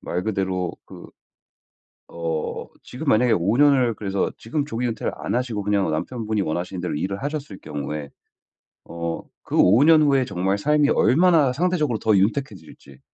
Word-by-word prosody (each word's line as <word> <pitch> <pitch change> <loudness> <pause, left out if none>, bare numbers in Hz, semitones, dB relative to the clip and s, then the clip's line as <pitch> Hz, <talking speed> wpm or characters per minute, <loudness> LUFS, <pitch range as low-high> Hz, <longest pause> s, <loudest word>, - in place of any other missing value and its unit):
말 90 - -3
그대로 95 -4 -2
그 - - -12 1.0
어 80 -2 -4 0.2
지금 130 +6 -8
만약에 120 0 +4
5 100 +3 +1
년을 135 -4 +4
그래서 100 -2 -2
지금 140 +6 -3
조기 125 -4 -3
은퇴를 115 - -3
안 - - -4
하시고 120 -4 -2
그냥 100 -3 +1
남편분이 110 +6 -2
원하시는 90 +2 -3
대로 90 - -3
일을 100 +7 -3
하셨을 145 -8 -5
경우에 75 0 -5 0.7
어 85 0 -5 0.2
그 - - -4
5 110 +10 +5
년 160 0 +6
후에 140 -3 +3
정말 95 -4 -1
삶이 150 +6 +2
얼마나 155 -2 +4
상대적으로 155 -5 0
더 110 -1 +2
윤택해질지 95 - -3
110 Hz, 320 characters per minute, -23 LUFS, 90-135 Hz, 1.0 s, 년